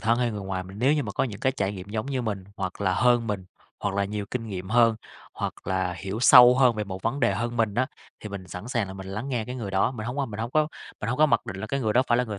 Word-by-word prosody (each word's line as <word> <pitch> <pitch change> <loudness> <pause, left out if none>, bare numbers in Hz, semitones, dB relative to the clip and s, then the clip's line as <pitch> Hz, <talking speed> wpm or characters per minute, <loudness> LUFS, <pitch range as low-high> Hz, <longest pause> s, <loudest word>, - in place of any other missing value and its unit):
thân 115 +1 +2
hay 120 -1 +1
người 105 -2 -5
ngoài, 95 -1 -3
mình 95 +2 -11
nếu 130 +5 +4
như 150 -2 +1
mà 105 - -5
có - - +1
những 105 -5 -6
cái 130 - +2
trải 100 -5 -1
nghiệm 95 -1 -8
giống 110 +3 -3
như 135 -2 -2
mình, 100 -5 -3
hoặc 95 0 -4
là 95 -2 +1
hơn 120 -1 +3
mình, 100 -4 -3 0.4
hoặc 100 -1 -1
là 100 - +1
nhiều 105 +1 -3
kinh 120 -2 -3
nghiệm 95 -3 -5
hơn, 115 -1 +4 0.4
hoặc - - -3
là 95 -1 0
hiểu 95 +4 -5
sâu 125 -1 +9
hơn 125 -3 +5
về 105 -1 -2
một 95 -1 -7
vấn 135 +5 -1
đề 100 -7 +3
hơn 120 +2 -2
mình 110 -3 +1
á, 130 +3 +2 0.3
thì 105 - -7
mình 95 -2 -7
sẵn 90 +6 -7
sàng 120 -5 0
là 95 - -8
mình 95 0 -8
lắng 105 +8 -5
nghe 120 -4 -1
cái 125 - -6
người 115 -6 -5
đó. 95 +4 +2
Mình 115 -4 -6
hông 125 +3 -4
có 140 -2 0
mình 110 -1 -6
hông 115 +1 -3
có 155 +2 +3 0.3
mình 105 - -3
hông 125 - -1
có 155 - +6
mặc 120 -6 +1
định 95 - -5
là 95 - -5
cái 135 +5 -2
người 110 -4 +1
đó 125 - +4
phải 120 - +3
là 125 - +2
người 105 -4 -5
110 Hz, 325 wpm, -26 LUFS, 100-125 Hz, 0.4 s, sâu